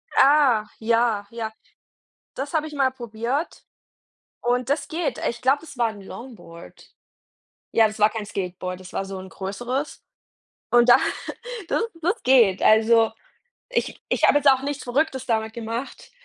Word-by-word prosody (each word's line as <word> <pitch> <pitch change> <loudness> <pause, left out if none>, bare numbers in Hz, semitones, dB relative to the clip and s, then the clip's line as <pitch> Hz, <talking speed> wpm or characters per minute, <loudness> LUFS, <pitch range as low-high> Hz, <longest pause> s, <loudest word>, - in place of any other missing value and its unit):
Ah, 270 -6 +5
ja, 230 -2 +1
ja. 230 -1 -4 0.8
Das 275 +2 -5
habe 310 -1 0
ich 305 - -10
mal 270 -2 +2
probiert. 240 +4 -4 0.8
Und 245 +1 0
das 285 0 0
geht. 330 +1 -2
Ich 235 - -5
glaube, 265 +3 +4
das 320 -4 -12
war 235 -1 +2
'n 210 -2 -11
Longboard. 190 -6 -12 0.8
Ja, 225 -1 +5
das 215 0 -9
war 210 +1 +5
kein 215 -1 -5
Skateboard, 185 -2 -5
das 185 -1 -12
war 195 - -2
so 195 0 -6
'n 190 0 -10
größeres. 245 +10 -4 0.7
Und 240 0 +5
da 240 - +9 0.7
das 450 - +1 0.2
das 365 +8 0
geht. 235 -7 +4
Also, 225 +1 +5 0.6
ich - - -2
ich - - 0
habe 290 - +6
jetzt 285 -1 +5
auch 265 -1 +2
nichts 285 0 -4
Verrücktes 265 +1 -1
damit 220 -2 0
gemacht. 235 +3 -6
235 Hz, 155 wpm, -23 LUFS, 215-275 Hz, 0.8 s, da